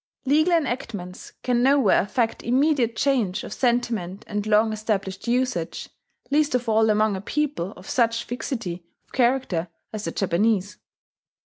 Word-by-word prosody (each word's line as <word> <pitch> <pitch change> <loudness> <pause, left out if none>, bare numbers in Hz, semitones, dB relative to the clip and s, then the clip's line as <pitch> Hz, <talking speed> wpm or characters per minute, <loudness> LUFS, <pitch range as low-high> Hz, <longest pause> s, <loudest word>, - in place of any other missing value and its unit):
Legal 310 +6 +3
enactments 230 - -4
can 245 -1 +1
nowhere 265 -5 +4
effect 225 +3 -1
immediate 255 -2 +2
change 225 -8 +1
of - - -6
sentiment 235 -7 -1
and 210 0 -3
long 215 +1 +3
established 200 -2 -3
usage, 245 -8 -1 0.4
least 295 -2 +2
of 250 -1 -1
all 220 0 +3
among 215 -1 +2
a 190 - -5
people 285 - -2
of - - -14
such 230 -2 +1
fixity 230 - -4 0.2
of - - -36
character 240 -9 +1 0.3
as 215 -1 -4
the - - -2
Japanese. 200 +2 0
230 Hz, 140 wpm, -24 LUFS, 200-255 Hz, 0.4 s, nowhere